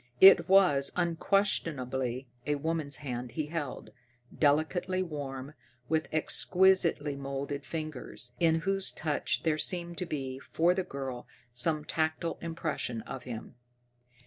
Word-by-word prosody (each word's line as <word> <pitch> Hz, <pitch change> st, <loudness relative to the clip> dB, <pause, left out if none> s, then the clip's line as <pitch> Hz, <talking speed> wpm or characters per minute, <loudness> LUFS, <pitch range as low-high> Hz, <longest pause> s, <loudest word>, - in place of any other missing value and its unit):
It 190 Hz, -3 st, +9 dB
was 180 Hz, -8 st, +5 dB
unquestionably 150 Hz, -8 st, 0 dB, 0.2 s
a 150 Hz, -, +2 dB
woman's 155 Hz, -1 st, -1 dB
hand 125 Hz, -2 st, -4 dB
he 155 Hz, -, -1 dB
held, 150 Hz, -3 st, -5 dB, 0.4 s
delicately 160 Hz, +5 st, +2 dB
warm, 140 Hz, -4 st, -6 dB, 0.4 s
with 160 Hz, 0 st, +1 dB
exquisitely 170 Hz, -2 st, +3 dB
moulded 140 Hz, +1 st, -4 dB
fingers, 150 Hz, -5 st, -6 dB
in 160 Hz, -1 st, +3 dB
whose 195 Hz, +1 st, 0 dB
touch 150 Hz, -3 st, -1 dB
there 155 Hz, -2 st, +1 dB
seemed 175 Hz, -1 st, -2 dB
to 180 Hz, -, -3 dB
be, 135 Hz, -4 st, -4 dB
for 170 Hz, +5 st, +2 dB
the 190 Hz, -, 0 dB
girl, 135 Hz, -6 st, -6 dB, 0.3 s
some 150 Hz, +5 st, +1 dB
tactile 160 Hz, +1 st, -1 dB
impression 160 Hz, -8 st, -3 dB
of 130 Hz, -, -7 dB
him. 115 Hz, -3 st, -7 dB
155 Hz, 120 wpm, -30 LUFS, 135-170 Hz, 0.4 s, It